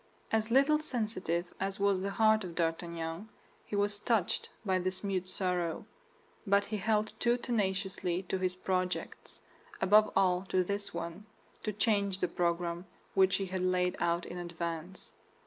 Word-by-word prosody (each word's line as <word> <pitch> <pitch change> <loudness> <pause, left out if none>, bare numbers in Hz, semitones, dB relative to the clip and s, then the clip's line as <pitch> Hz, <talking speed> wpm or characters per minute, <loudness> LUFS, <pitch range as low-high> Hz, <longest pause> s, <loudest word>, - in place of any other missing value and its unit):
As 220 0 +1
little 275 +5 +5
sensitive 210 - -2
as 195 +1 -2
was 200 -2 +2
the 200 - -1
heart 215 +1 +4
of 175 -3 -7
D'Artagnan, 165 +3 -2 0.3
he - - -5
was 205 0 +1
touched 215 -5 0 0.2
by 190 -2 +2
this 185 +2 -1
mute 190 -2 -1
sorrow; 180 -3 -1 0.6
but 200 +1 +4
he 215 - -3
held 215 +1 +1
too 240 0 +3
tenaciously 190 -6 -1
to 190 +1 -2
his 185 -1 0
projects, 185 0 -3 0.4
above 210 +2 +5
all 180 -2 +3
to 185 -1 +2
this 200 +2 -3
one, 170 +5 -6 0.3
to 215 - -2
change 200 -2 +1
the 180 - 0
program 170 +1 -1 0.3
which 190 -1 +4
he 195 - -1
had 185 0 -3
laid 180 0 +1
out 170 0 +1
in 175 - -6
advance. 170 +1 -5
190 Hz, 155 wpm, -32 LUFS, 180-205 Hz, 0.6 s, little